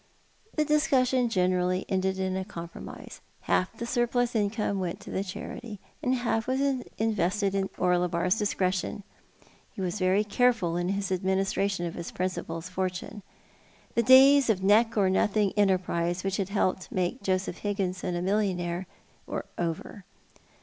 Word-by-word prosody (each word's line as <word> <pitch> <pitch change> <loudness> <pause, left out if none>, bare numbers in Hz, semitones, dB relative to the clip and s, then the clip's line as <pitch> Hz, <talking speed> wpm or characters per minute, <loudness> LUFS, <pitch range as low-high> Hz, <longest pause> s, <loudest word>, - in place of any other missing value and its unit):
The 305 - +2
discussion 265 -5 +2
generally 185 -2 +1
ended 190 0 0
in 190 0 -1
a 190 - -1
compromise. 170 -4 -9 0.2
Half 185 +5 0
the 235 - -4
surplus 240 0 +1
income 205 -1 0
went 180 -2 -3
to - - -9
the 190 - -1
charity, 205 +3 -7 0.2
and 255 +1 +1
half 225 -3 -1
was 260 +1 0 0.4
invested 205 -2 0
at 195 -1 0
Orlebar's 180 +2 +1
discretion. 190 -1 -1 0.7
He - - -10
was 185 +2 -2
very 185 +2 +3
careful 215 -5 +2
in 175 +1 -1
his 195 -1 -2
administra 190 +1 +1
tion 185 -3 -2
of 170 - -4
his 170 - -6
principal's 180 -2 -4
fortune. 185 +3 -4 0.7
The 235 - +3
days 265 +2 +7
of 190 -4 +1
neck 225 +3 +4
or 200 -2 +4
nothing 200 +1 +2
enterprises 185 -3 +1
which 195 0 -1
had 195 -1 -2
helped 190 -2 0
to - - -10
make 180 +1 -1
Joseph 185 -2 -1
Higginson 185 -3 -2
a 175 - -2
millionnaire 185 -3 -1 0.4
were - - -4
over. 170 +4 -4
195 Hz, 150 wpm, -28 LUFS, 180-215 Hz, 0.7 s, days